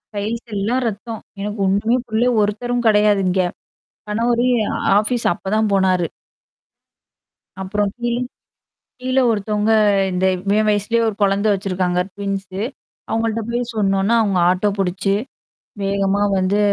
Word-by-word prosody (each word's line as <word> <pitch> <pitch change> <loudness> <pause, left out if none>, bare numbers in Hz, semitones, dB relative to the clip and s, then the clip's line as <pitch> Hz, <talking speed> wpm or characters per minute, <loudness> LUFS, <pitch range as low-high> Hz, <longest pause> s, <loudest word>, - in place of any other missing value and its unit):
Tiles 220 +4 -3
எல்லாம் 230 +6 0
ரத்தம், 220 +1 -5 0.2
எனக்கு 210 +1 -4
ஒண்ணுமே 215 +6 +2
புரியல, 230 +3 +1
ஒருத்தரும் 240 +3 -2
கிடையாது 210 -2 +4
இங்க. 185 +1 +2 0.7
கணவரும், 240 +3 +1 0.4
ஆபீஸ் 230 +3 0
அப்பதான் 215 +4 -1
போனாரு. 185 -3 +2 1.6
அப்புறம் 205 +1 -1
கீ 240 0 -2 0.9
கீழ 255 +1 -2
ஒருத்தவங்க 210 0 0 0.8
இவன் 215 0 +2
வயசுலயே 210 +3 +1
ஒரு 215 - -2
குழந்தை 200 +2 +2
வெச்சிருக்காங்க, 185 -2 -1
ட்வின்ஸ் 195 -1 -4 0.6
அவங்கள்ட்ட 225 0 0
போய் 240 +1 -1
சொன்ன 195 -2 +1
உடனே 215 +5 +2
அவங்க 200 -4 +1
ஆட்டோ 185 +3 +2
புடிச்சு 195 +1 0 0.7
வேகமா 195 0 0 0.2
வந்து 190 +2 +1
210 Hz, 115 wpm, -19 LUFS, 195-225 Hz, 1.6 s, கிடையாது